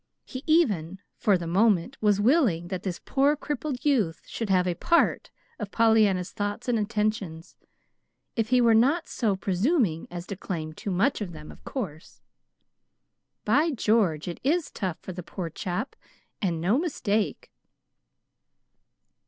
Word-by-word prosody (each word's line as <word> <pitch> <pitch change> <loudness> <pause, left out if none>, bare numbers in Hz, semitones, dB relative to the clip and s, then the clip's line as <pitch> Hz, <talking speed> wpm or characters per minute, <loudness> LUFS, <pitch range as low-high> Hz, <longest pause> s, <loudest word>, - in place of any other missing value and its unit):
He 260 +1 -7
even, 205 - +2 0.2
for 200 -3 +3
the 175 - -6
moment, 200 +5 +2
was 205 -2 +3
willing 210 - +2
that 185 -2 -3
this 185 -3 -4
poor 280 +2 +3
crippled 295 -2 -4
youth 220 - +2
should 225 -3 -5
have 185 -1 +3
a 180 - 0
PART 340 - +2 0.3
of 210 -3 -4
Pollyanna's 215 -5 +3
thoughts 205 +2 -4
and 240 -2 +2
attentions, 210 -6 -2 0.8
if 225 -2 0
he 250 -1 +4
were 230 -1 +5
not 275 +10 +3
so 215 -5 0
presuming 190 - 0
as 175 0 -6
to 200 - -5
claim 160 -5 -5
too 200 - -6
much 200 +8 +1
of 180 -4 -4
them, 150 -1 -10
of - - -17
course! 180 - -6 1.2
"By 285 +10 +3
George! 210 - +1
it 175 - -5
is 320 +4 +1
tough 185 -5 -3
for 185 - -7
the 180 - -6
poor 170 0 -6
chap, 180 - -4 0.5
and 175 -5 0
no 195 - +2
mistake." 220 - -1
205 Hz, 150 wpm, -26 LUFS, 180-245 Hz, 1.2 s, were